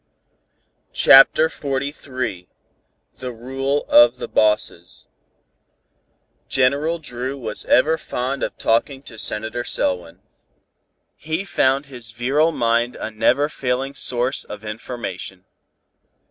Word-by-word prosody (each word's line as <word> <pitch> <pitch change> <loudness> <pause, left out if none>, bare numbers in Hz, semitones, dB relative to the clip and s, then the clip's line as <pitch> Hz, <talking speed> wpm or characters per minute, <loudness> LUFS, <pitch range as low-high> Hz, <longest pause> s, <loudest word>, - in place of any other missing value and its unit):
CHAPTER 135 +4 +7
XLIII 130 - -4 0.7
THE 125 -1 -5
RULE 135 +4 -3
OF 120 +1 +6
THE - - -6
BOSSES 105 -5 0 1.4
General 140 +6 +1
Dru 130 -3 -5
was 110 -5 -4
ever 160 +5 +3
fond 130 +3 -3
of - - -3
talking 135 +4 0
to 110 -5 -11
Senator 110 +3 -1
Selwyn. 90 -7 -2 0.9
He 160 +5 -4
found 135 -5 +1
his 120 -5 -9
virile 140 +7 +1
mind 120 -2 0
a - - -5
never 140 +6 +2
failing 135 -1 -2
source 125 -1 +1
of 105 +1 -10
information. 105 -4 -6
125 Hz, 105 wpm, -21 LUFS, 115-140 Hz, 1.4 s, CHAPTER